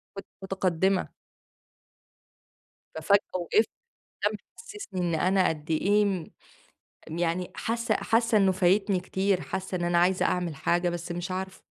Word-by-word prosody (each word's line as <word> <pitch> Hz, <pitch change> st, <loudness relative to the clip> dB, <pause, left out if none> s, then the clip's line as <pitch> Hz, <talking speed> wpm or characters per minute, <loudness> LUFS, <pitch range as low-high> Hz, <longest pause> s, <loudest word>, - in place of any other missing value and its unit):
كنت 195 Hz, -, -7 dB, 0.2 s
متقدمة. 190 Hz, 0 st, 0 dB, 1.8 s
ففجأة 185 Hz, +4 st, +2 dB
وقفت، 195 Hz, +6 st, +2 dB, 0.6 s
ده -, -, +3 dB, 0.2 s
محسّسني 415 Hz, -, -7 dB
إن 170 Hz, -2 st, 0 dB
أنا 185 Hz, +2 st, +3 dB
قد 155 Hz, 0 st, -5 dB
إيه 205 Hz, +6 st, +3 dB
م 185 Hz, -5 st, -1 dB, 0.8 s
يعني 170 Hz, +2 st, -1 dB
حاسّة 230 Hz, 0 st, -1 dB
حاسّة 230 Hz, -1 st, +2 dB
إنه 195 Hz, -2 st, +4 dB
فايتني 190 Hz, +1 st, +2 dB
كتير، 190 Hz, 0 st, 0 dB
حاسّة 185 Hz, +6 st, -4 dB
إن 175 Hz, -, -2 dB
أنا 175 Hz, 0 st, +2 dB
عايزة 180 Hz, +2 st, +3 dB
أعمل 175 Hz, -3 st, -1 dB
حاجة، 175 Hz, +5 st, +1 dB
بس 175 Hz, 0 st, -4 dB
مش 175 Hz, +2 st, -4 dB
عارفة. 190 Hz, +1 st, -5 dB
185 Hz, 135 wpm, -27 LUFS, 175-195 Hz, 1.8 s, إنه